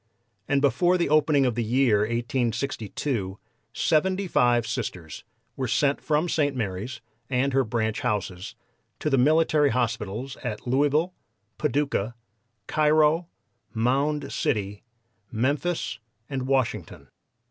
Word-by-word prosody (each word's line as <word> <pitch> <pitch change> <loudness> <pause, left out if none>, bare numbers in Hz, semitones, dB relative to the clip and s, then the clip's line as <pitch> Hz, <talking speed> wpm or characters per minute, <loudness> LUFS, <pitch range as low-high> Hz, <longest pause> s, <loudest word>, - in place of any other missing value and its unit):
And 140 -1 +2
before 175 +6 +3
the 170 - 0
opening 150 -2 +4
of 125 - +1
the 120 +1 -1
year 120 -1 +3
1862 115 -2 -2 0.3
seventy 185 +9 +1
five 120 -7 +3
Sisters 95 - -5 0.3
were 130 - -2
sent 140 +4 +1
from 155 +2 +1
St. 145 -4 +1
Mary's, 115 +2 -4 0.3
and 135 +1 +1
her 135 0 +3
branch 110 -1 -1
houses, 100 -5 -3 0.4
to 150 - -2
the 135 - +4
military 155 +1 +4
hospitals 120 +1 -2
at 110 -4 -5
Louisville, 145 +7 +2 0.5
Paducah, 140 -6 0 0.5
Cairo, 155 - +3 0.5
Mound 140 +5 0
City, 100 -2 -1 0.5
Memphis 135 +2 -1 0.3
and 130 -2 -3
Washington. 135 -3 -1
130 Hz, 115 wpm, -26 LUFS, 115-150 Hz, 0.5 s, opening